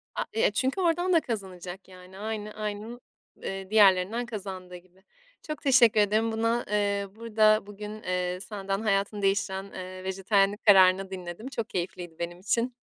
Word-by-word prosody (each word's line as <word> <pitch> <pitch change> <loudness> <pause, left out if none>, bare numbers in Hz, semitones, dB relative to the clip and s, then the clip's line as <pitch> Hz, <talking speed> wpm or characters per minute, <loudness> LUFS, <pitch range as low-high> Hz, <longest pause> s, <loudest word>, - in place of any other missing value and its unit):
A - - 0
eee, 220 - +2
çünkü 260 - 0
oradan 350 +2 +2
da 335 - +6
kazanacak, 190 - -6
yani, 185 0 -14
aynı 215 0 -4
aynın, 215 +3 -5 0.4
eee, 195 0 -5
diğerlerinden 205 +2 +4
kazandığı 190 -5 -7
gibi. 185 +1 -17 0.4
Çok 305 -2 -6
teşekkür 245 -6 +5
ederim 215 +2 +2
buna 230 +2 0
eee, 200 -1 0
burada 215 -2 +3
bugün, 210 +1 -8
eee, 180 0 -1
senden 195 0 -4
hayatını 200 -1 0
değiştiren, 195 0 0
eee, 185 0 -7
vejetaryenlik 195 +2 +1
kararını 190 -1 +6
dinledim. 185 +4 -7
Çok 230 -5 -4
keyifliydi 175 -2 -5
benim 170 +1 -5
için. 235 +6 0
200 Hz, 150 wpm, -27 LUFS, 185-220 Hz, 0.4 s, da